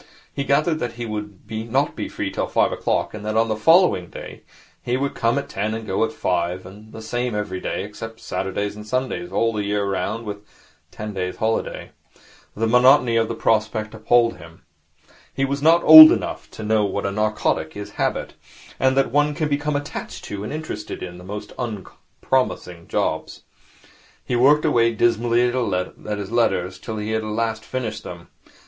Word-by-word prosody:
He 140 - -3
gathered 155 +3 +2
that 120 -4 -3
he 120 0 -6
would 105 -2 -5
not 115 +6 -1
be - - -4
free - - -4
till - - -2
five - - +2
o'clock, - - -1
and 105 -1 -7
that 110 +1 -2
on 115 0 +2
the 110 - 0
following 165 - +4
day - - -10 0.4
he 125 +1 -1
would 140 +1 -2
come 115 +3 +1
at 140 0 -2
ten 110 -2 -2
and 110 0 -6
go 95 +2 0
at 110 - 0
five, 90 -2 -2
and 105 +3 -13
the 110 - -9
same 120 +1 -2
every 105 -3 -3
day, - - -3
except 115 0 -8
Saturdays 95 +2 -3
and 105 0 -10
Sundays, 130 +9 -2
all 115 0 +1
the 105 -1 -2
year 100 0 -1
round, 100 +4 -2
with 105 -1 -5
a - - -22 0.5
ten 105 0 -7
days' 90 -1 -3
holiday. 110 0 -2 0.6
The 115 - 0
monotony 125 +1 +5
of 115 -1 +2
the 115 - -4
prospect 110 -1 0
appalled 115 +1 +2
him. 80 0 -15 0.7
He 135 - -1
was 140 +1 -3
not 165 +3 +5
old 155 0 +12
enough - - -3
to 110 - -9
know 110 0 +2
what 100 0 -2
a 100 - -1
narcotic 105 -5 -1
is 105 - -7
Habit, - - -2 0.5
and 130 0 +2
that 135 - +2
one 145 +2 +2
can 155 -2 -1
become 145 +1 -1
attached 145 0 -5
to 100 -1 -6
and 105 - -5
interested 155 -8 -6
in 90 -1 -8
the - - -12
most 105 +2 -7
unpromising 105 -4 -3
jobs. - - -2 0.8
He 125 - -1
worked 145 +6 +4
away 115 -6 +3
dismally 120 +1 +2
at 105 -4 -2
his 100 0 -6
letters 100 -6 0
till 110 - -6
he 105 +1 -3
had 110 +1 -1
finished 120 0 -5
them. - - -10
110 Hz, 185 wpm, -22 LUFS, 105-125 Hz, 0.8 s, old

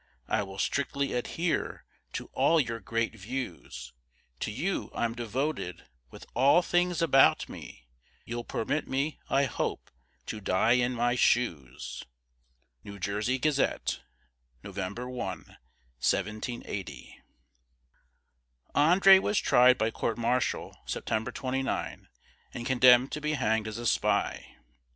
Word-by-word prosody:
I - - +1
will 95 -1 -7
strictly 140 +4 -1
adhere 160 +7 -2 0.3
to - - -6
all 165 - +4
your 115 -5 -1
great 115 0 -2
views; 115 -3 -6 0.5
To - - -2
you 175 - -2
I'm 115 -1 0
devoted, 120 - -3 0.2
with - - -12
all 140 +8 +5
things 175 0 +1
about 135 -5 +5
me 60 - -11 0.4
You'll 120 0 -4
permit 150 +7 -2
me, 140 +3 -1
I 135 +1 +3
hope, - - -3 0.3
to 105 - -6
die 95 +4 +2
in 125 0 +3
my 120 +1 +1
shoes." 85 - 0 0.8
New 100 0 -9
Jersey 105 +7 -1
Gazette, 130 - 0 0.6
November 100 +5 -5
1, 125 -4 -4 0.7
1780. 105 - -3 1.5
André 190 +6 +7
was 205 - 0
tried 125 +1 +5
by 110 -1 0
court 115 +1 -2
martial 120 +1 -1
September 110 0 -2
29, 135 0 -3 0.5
and 120 - -5
condemned 125 0 +6
to 150 - -4
be 150 0 -1
hanged 110 -5 0
as 110 0 -5
a 120 - -6
spy. - - 0
120 Hz, 120 wpm, -29 LUFS, 110-140 Hz, 1.5 s, André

